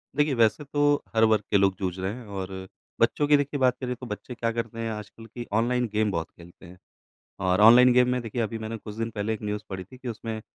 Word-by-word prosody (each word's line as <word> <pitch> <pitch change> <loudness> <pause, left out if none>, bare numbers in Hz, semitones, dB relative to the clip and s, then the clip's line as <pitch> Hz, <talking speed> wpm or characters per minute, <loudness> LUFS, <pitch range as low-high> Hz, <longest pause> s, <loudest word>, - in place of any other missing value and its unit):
देखिए 150 -1 +2
वैसे 115 +3 +2
तो 145 +1 -2 0.3
हर 110 - +4
वर्ग 110 -2 +4
के 100 - +5
लोग 95 -1 +3
जूझ 95 -2 -2
रहे 95 +3 -2
हैं 125 -1 -9
और 95 0 -4 0.5
बच्चों 145 - +2
की 145 0 +6
देखिए 145 0 -2
बात 130 -1 +3
करें, 125 -1 -2
तो 125 - -10
बच्चे 120 +2 -7
क्या 115 0 -1
करते 115 0 -4
हैं 115 0 -2
आजकल 105 +1 -9
कि 120 +2 -8
ऑनलाइन 125 +1 +1
गेम 110 -1 +1
बहुत 85 -3 -3
खेलते 85 +2 -16
हैं। 90 +1 -13 0.6
और 95 +1 +2
ऑनलाइन 120 +3 +8
गेम 125 0 +5
में 125 -1 0
देखिए 115 +1 -3
अभी 115 0 -2
मैंने 110 +1 -5
कुछ 105 -1 -9
दिन 115 0 -2
पहले 105 0 -2
एक 110 - -7
न्यूज़ 105 0 -3
पढ़ी 95 -2 -5
थी 115 +8 -15
कि 125 0 -9
उसमें 110 0 -5
115 Hz, 250 wpm, -26 LUFS, 105-125 Hz, 0.6 s, ऑनलाइन